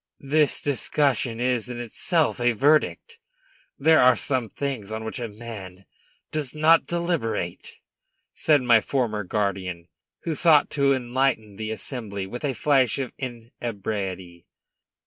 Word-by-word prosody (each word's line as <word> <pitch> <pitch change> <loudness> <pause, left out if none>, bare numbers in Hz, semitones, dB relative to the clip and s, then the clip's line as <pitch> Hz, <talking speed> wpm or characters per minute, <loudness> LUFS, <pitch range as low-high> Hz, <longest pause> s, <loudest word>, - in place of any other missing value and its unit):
"This 150 +1 +1
discussion 135 -4 0
is, 125 -1 0
in 120 -1 -5
itself, 145 +7 0
a 120 0 +3
verdict. 155 - +1 0.6
There 160 +3 +5
are 125 -2 +6
some 130 -3 -1
things 130 -5 -4
on 110 0 -4
which 110 +4 -5
a 120 - -3
man 105 -4 -9 0.5
does 150 -3 -3
not 160 +2 +4
deliberate," 170 - -2 0.6
said 150 -4 +3
my 120 -3 +5
former 115 -6 -1
guardian, 95 -3 -3 0.3
who 165 - -1
thought 155 -1 +4
to 140 -2 +3
enlighten 125 -4 0
the 110 0 -4
assembly 110 -2 -4
with 120 +8 -7
a 140 -2 0
flash 130 -1 +2
of 135 -3 -3
inebriety. 105 -7 -5
120 Hz, 130 wpm, -25 LUFS, 105-140 Hz, 0.6 s, are